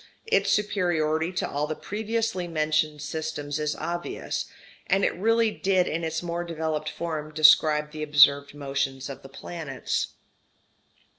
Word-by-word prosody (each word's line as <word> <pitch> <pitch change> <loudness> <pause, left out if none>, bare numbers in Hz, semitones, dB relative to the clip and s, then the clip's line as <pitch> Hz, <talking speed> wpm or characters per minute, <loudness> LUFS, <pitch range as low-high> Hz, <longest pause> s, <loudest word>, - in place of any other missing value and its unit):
Its 195 - +2
superiority 175 -5 +1
to 180 - -2
all 145 +1 -2
the 155 - -3
previously 220 -2 -2
mentioned 155 -2 0
systems 155 -2 -4
is 150 0 -1
obvious. 175 +2 -3 0.4
And 195 +1 +3
it - - +1
really 225 +3 +2
did 190 -3 +1
in 165 +2 -2
its 160 +1 -2
more 170 0 -2
developed 160 -2 -3
form 155 -3 -4
describe 150 -1 +5
the 155 0 -7
observed 145 -1 +5
motions 135 -1 -2
of 135 - -9
the 135 - -12
planets. 150 -2 -4
155 Hz, 140 wpm, -26 LUFS, 150-175 Hz, 0.4 s, describe